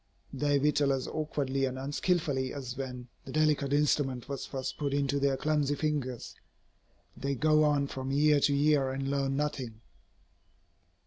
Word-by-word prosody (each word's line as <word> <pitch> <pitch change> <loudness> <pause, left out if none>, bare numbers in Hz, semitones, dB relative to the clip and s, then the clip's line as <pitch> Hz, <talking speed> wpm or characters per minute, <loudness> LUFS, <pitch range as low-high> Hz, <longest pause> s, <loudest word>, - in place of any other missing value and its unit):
They 145 +1 +1
whittle 145 0 +2
as 130 -1 -2
awkwardly 140 -3 -1
and 130 0 -3
unskilfully 145 -1 -1
as 130 -3 -5
when 125 -3 -6
the - - -9
delicate 150 -3 +2
instrument 145 -3 +1
was 140 -1 -5
first 130 -1 -5
put 140 -2 -1
into 140 0 +1
their 140 -1 +1
clumsy 150 -1 +1
fingers. 140 -5 -2 0.8
They 140 +1 -2
go 155 +3 +4
on 145 -2 +2
from 135 -1 -5
year 145 +1 +4
to 140 0 +2
year 145 -2 +3
and 135 +1 -2
learn 135 -1 0
nothing. 130 -6 -3
140 Hz, 150 wpm, -30 LUFS, 135-150 Hz, 0.8 s, go